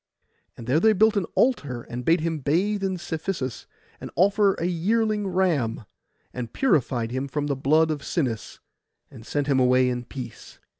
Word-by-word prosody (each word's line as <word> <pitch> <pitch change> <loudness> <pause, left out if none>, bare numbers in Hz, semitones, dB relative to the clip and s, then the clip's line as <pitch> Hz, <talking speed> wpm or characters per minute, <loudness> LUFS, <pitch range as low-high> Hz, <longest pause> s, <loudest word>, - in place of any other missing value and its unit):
And 115 - -9
there 130 +6 +2
they 220 +5 +5
built 220 +2 +4
an 200 -4 0
altar, 145 - +1
and 120 +1 -6
bade 165 +5 +3
him 165 -1 -2
bathe 190 +9 0
in 190 -1 -1
Cephisus, 160 - -4 0.3
and - - -7
offer 200 +1 +3
a 170 - -3
yearling 210 +4 0
ram, 160 - 0 0.5
and 120 -3 -5
purified 125 - +1
him 130 +2 -2
from 145 +2 -2
the 145 -1 -1
blood 155 +4 +3
of 150 -2 -3
Sinis, 130 -11 -3 0.5
and 115 - -13
sent 145 -1 -1
him 135 -2 +2
away 125 0 +4
in 125 -1 -3
peace. 125 -2 -9
155 Hz, 170 wpm, -25 LUFS, 125-190 Hz, 0.5 s, they